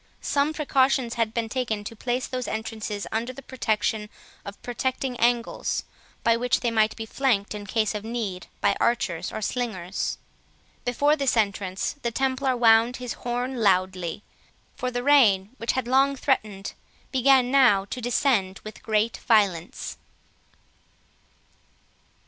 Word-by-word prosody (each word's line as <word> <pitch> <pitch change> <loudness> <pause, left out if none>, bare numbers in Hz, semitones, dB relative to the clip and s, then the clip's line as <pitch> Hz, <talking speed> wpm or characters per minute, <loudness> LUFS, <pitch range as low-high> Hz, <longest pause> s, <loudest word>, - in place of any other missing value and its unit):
Some 285 +1 +1
precautions 270 -5 +1
had 230 -2 0
been 230 0 -2
taken 225 -3 -2
to 230 - -7
place 245 +3 -2
those 255 -1 -4
entrances 220 -2 -4
under 230 +3 -2
the 275 +2 -11
protection 220 -3 -1 0.3
of 200 0 -9
projecting 255 +1 -2
angles, 235 0 0 0.4
by 230 0 +4
which 245 +1 +1
they 240 - 0
might 220 -1 +2
be 225 - -5
flanked 220 -5 0
in 205 -1 -7
case 215 +1 0
of 210 -1 -4
need 220 -6 -4
by 200 -1 +3
archers 205 -8 0
or 215 - -5
slingers. 195 -7 -2 0.7
Before 285 +5 +3
this 275 -5 +1
entrance 200 +2 -1
the 235 - 0
Templar 260 +1 0
wound 230 +1 +5
his 250 -2 -5
horn 245 +2 -3
loudly; 185 -3 +1 0.5
for 255 - -2
the 245 0 -3
rain, 220 -9 +5
which 230 - -1
had 260 -2 -2
long 270 +2 +3
threatened, 210 -8 -1 0.4
began 260 -1 +4
now 245 -8 +5
to 250 +5 -6
descend 230 -5 +1
with 215 - -9
great 220 +1 0
violence. 195 -7 +1
230 Hz, 140 wpm, -25 LUFS, 210-255 Hz, 0.7 s, wound